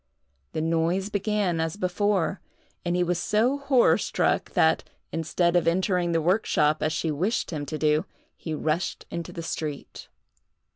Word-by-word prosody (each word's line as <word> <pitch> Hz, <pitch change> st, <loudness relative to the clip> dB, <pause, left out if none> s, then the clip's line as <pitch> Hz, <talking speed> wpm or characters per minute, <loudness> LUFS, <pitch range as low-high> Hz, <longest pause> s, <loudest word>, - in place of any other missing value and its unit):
The 155 Hz, -, -1 dB
noise 165 Hz, +4 st, 0 dB
began 205 Hz, -4 st, 0 dB
as 160 Hz, +3 st, -2 dB
before, 195 Hz, 0 st, 0 dB, 0.4 s
and 175 Hz, 0 st, 0 dB
he 180 Hz, -, +2 dB
was 175 Hz, 0 st, 0 dB
so 230 Hz, +9 st, +1 dB
horror 275 Hz, -3 st, +4 dB
struck -, -, 0 dB
that, -, -, +3 dB, 0.3 s
instead 170 Hz, +2 st, 0 dB
of 175 Hz, -2 st, +3 dB
entering 180 Hz, 0 st, +1 dB
the 165 Hz, -, +2 dB
workshop 155 Hz, -4 st, +2 dB
as 155 Hz, -, +1 dB
she 155 Hz, +1 st, -1 dB
wished 180 Hz, +10 st, -1 dB
him 145 Hz, -3 st, -4 dB
to 155 Hz, -, -3 dB
do, 150 Hz, 0 st, +2 dB, 0.3 s
he 160 Hz, -2 st, -5 dB
rushed 160 Hz, +4 st, -2 dB
into 170 Hz, -1 st, -5 dB
the 170 Hz, -, -6 dB
street. 150 Hz, -3 st, -5 dB
170 Hz, 155 wpm, -26 LUFS, 160-195 Hz, 0.4 s, horror